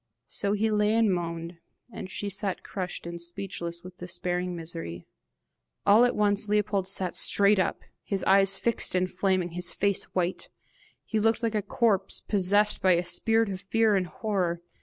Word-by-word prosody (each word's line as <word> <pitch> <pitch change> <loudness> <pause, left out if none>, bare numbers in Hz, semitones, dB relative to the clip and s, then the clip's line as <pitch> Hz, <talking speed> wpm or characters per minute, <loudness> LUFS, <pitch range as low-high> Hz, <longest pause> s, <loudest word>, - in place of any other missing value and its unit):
So 200 0 -1
he 215 +1 0
lay 210 +1 +2
and 225 -4 +3
moaned, 170 0 -5 0.3
and 185 - -7
she 205 - -5
sat 195 -1 -2
crushed 185 -3 -5
and 170 0 -6
speechless 170 -1 -5
with 180 0 -12
despairing 180 0 -3
misery. 160 - -5 0.8
All 220 +4 +6
at 245 - 0
once 205 0 +1
Leopold 205 -2 0
sat 190 -2 -1
straight 200 0 +4
up, 185 - -1 0.2
his 195 -2 -2
eyes 195 0 +5
fixed 235 -5 -1
and 185 0 0
flaming, 185 -1 0
his 175 +1 0
face 200 -1 0
white: 180 0 -1 0.6
he 220 - -1
looked 225 +2 +1
like 225 -1 0
a 210 - 0
corpse 210 -3 0
possessed 205 +1 +2
by 185 -1 +4
a 175 +1 0
spirit 225 +5 +1
of 190 -1 -5
fear 220 +1 +2
and 185 -2 0
horror. 175 -2 -2
195 Hz, 170 wpm, -27 LUFS, 180-210 Hz, 0.8 s, All